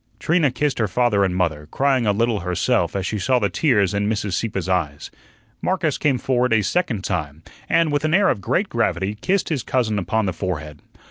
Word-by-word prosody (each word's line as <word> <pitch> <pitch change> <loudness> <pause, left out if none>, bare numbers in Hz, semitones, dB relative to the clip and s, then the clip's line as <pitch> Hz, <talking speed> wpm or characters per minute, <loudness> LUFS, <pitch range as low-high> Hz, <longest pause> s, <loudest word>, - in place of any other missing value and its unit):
Trina 160 -3 +2
kissed 140 +2 -1
her 110 - +2
father 105 0 +2
and 95 -2 0
mother, 80 -5 -1
crying 130 -1 +1
a - - +4
little 115 +1 0
herself 90 -1 0
as 95 -1 -2
she 105 +2 -2
saw 125 +7 +2
the 100 -5 0
tears 105 - +2
in 100 +1 0
Mrs. 105 -3 -2
Sieppe's 95 -2 -2
eyes. 75 -6 -2 0.5
Marcus - - 0
came 140 -4 +2
forward 125 -1 +1
a 110 -2 +3
second 120 - -1
time, 75 -2 -3 0.3
and, 165 -2 +3
with 145 0 0
an 155 +1 +2
air 200 0 +4
of 100 - -1
great - - 0
gravity, 100 +2 -1
kissed 190 +6 0
his 150 -6 -1
cousin 115 -4 0
upon 105 +4 0
the 95 - -1
forehead. 80 -5 -5
105 Hz, 205 wpm, -21 LUFS, 90-130 Hz, 0.5 s, a